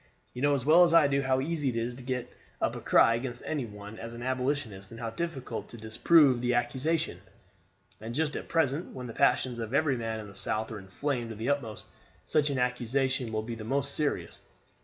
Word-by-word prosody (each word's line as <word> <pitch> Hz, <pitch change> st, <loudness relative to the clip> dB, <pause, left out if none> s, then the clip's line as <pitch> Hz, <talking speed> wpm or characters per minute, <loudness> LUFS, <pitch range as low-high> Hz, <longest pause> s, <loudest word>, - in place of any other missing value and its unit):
"You 125 Hz, -, -6 dB
know 145 Hz, 0 st, +4 dB
as 135 Hz, -2 st, -2 dB
well 160 Hz, +4 st, +7 dB
as 170 Hz, -1 st, +4 dB
I 165 Hz, -3 st, +7 dB
do 140 Hz, 0 st, +1 dB
how 130 Hz, -1 st, +1 dB
easy 150 Hz, -1 st, -1 dB
it 120 Hz, -, -3 dB
is 115 Hz, +1 st, -1 dB
to 130 Hz, -, -10 dB
get 125 Hz, -1 st, -3 dB, 0.3 s
up -, -, 0 dB
a -, -, -6 dB
cry 115 Hz, -, +5 dB
against 120 Hz, +1 st, -4 dB
any 145 Hz, -5 st, -2 dB
one 105 Hz, +1 st, -10 dB
as 115 Hz, 0 st, -7 dB
an 120 Hz, -, -7 dB
Abolitionist 125 Hz, -7 st, -2 dB
and 115 Hz, -, -10 dB
how 115 Hz, -1 st, -3 dB
difficult 140 Hz, 0 st, -4 dB
to 115 Hz, -, -10 dB
disprove 125 Hz, +4 st, +4 dB
the 125 Hz, 0 st, +1 dB
accusation; 130 Hz, -, 0 dB, 0.8 s
and 115 Hz, +2 st, -6 dB
just 150 Hz, 0 st, 0 dB
at -, -, -5 dB
present, 160 Hz, 0 st, 0 dB
when 125 Hz, -1 st, -6 dB
the 115 Hz, -, -7 dB
passions 125 Hz, 0 st, +2 dB
of 115 Hz, +3 st, -3 dB
every 140 Hz, -3 st, +2 dB
man 115 Hz, -1 st, -3 dB
in 110 Hz, -, -7 dB
the 100 Hz, -, -12 dB
South 110 Hz, +3 st, 0 dB
are 110 Hz, -, -5 dB
inflamed 120 Hz, +5 st, -3 dB
to 110 Hz, -, -6 dB
the 110 Hz, +5 st, -3 dB
utmost, 130 Hz, -7 st, -2 dB, 0.4 s
such 150 Hz, -1 st, +2 dB
an 140 Hz, -, -1 dB
accusation 125 Hz, 0 st, 0 dB
will 110 Hz, -1 st, -1 dB
be 115 Hz, +1 st, -5 dB
most 135 Hz, +5 st, -1 dB
serious. 150 Hz, -2 st, -2 dB
125 Hz, 220 wpm, -29 LUFS, 115-140 Hz, 0.8 s, well